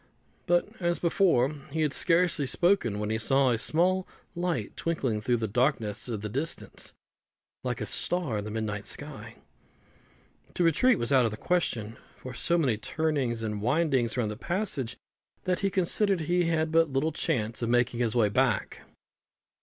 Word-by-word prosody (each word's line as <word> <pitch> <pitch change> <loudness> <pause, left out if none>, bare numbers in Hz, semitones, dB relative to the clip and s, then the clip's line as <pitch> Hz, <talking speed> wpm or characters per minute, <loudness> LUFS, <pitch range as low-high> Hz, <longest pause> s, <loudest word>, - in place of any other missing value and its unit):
But, 175 0 +3
as 175 -1 0
before, 165 -6 +2 0.2
he 160 +3 -2
had 150 -2 +1
scarcely 165 -4 +2
spoken, 170 - +2
when 105 +1 -2
he 110 - 0
saw 135 +3 +3
a 115 - +1
small 180 +7 +1 0.3
light 175 0 -2
twinkling 130 -10 -1
through 120 +2 +1
the 110 -1 -2
darkness 120 -1 0
of 110 -4 -3
the 105 - -3
distance, 140 +9 -4 0.7
like - - -2
a - - -1
star 165 -12 0
in - - -4
the - - -5
midnight 105 -2 -3
sky. - - -7 1.2
To 180 - +1
retreat 205 - +4
was 120 0 -1
out 130 -3 +5
of - - +2
the 105 - -7
question; 120 -12 -1 0.2
for 130 - -8
so 170 +8 +1
many 130 -10 +1
turnings 130 -2 -1
and 105 -2 -3
windings 130 -2 +1
were 125 - +2
in 105 - -1
the 105 - -4
passage, 165 - -2 0.5
that 180 0 0
he 200 - +1
considered 195 0 +1
he 175 +2 +1
had 160 -1 0
but 165 -1 +4
little 140 +4 0
chance 120 -8 -1
of 115 - -1
making 120 0 +2
his 120 -2 0
way 115 -3 +4
back. 105 - 0
135 Hz, 175 wpm, -28 LUFS, 115-170 Hz, 1.2 s, out